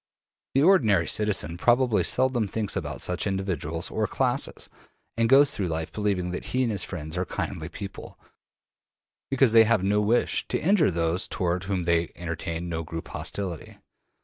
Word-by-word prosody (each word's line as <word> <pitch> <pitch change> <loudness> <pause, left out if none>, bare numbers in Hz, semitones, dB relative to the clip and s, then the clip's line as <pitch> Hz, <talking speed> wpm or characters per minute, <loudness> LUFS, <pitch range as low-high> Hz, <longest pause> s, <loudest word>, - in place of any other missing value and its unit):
The 135 - +4
ordinary 110 - +4
citizen 95 -6 0
probably 120 0 +3
seldom 130 -4 +1
thinks 105 0 -2
about - - -4
such 90 +1 -1
individuals 85 -4 -3
or - - 0
classes, - - -1 0.5
and 115 0 +1
goes 140 +2 +6
through 100 -8 -2
life 80 -1 -3
believing 100 -4 -1
that 90 - -5
he 130 +1 0
and 120 - 0
his 100 -3 -1
friends 80 -3 -6
are - - +1
kindly 80 -1 -4
people, 100 +3 -9 1.1
because 135 -4 +3
they 115 -1 +8
have 110 -4 +2
no 105 +2 +2
wish 110 +4 +1
to - - -1
injure 185 -2 +3
those 85 +2 -1
toward 90 -1 -2
whom 95 -2 -1
they 85 0 +1
entertain 85 0 -4
no 80 -1 -3
group 80 0 -7
hostility. 90 -6 -5
95 Hz, 165 wpm, -26 LUFS, 85-115 Hz, 1.1 s, they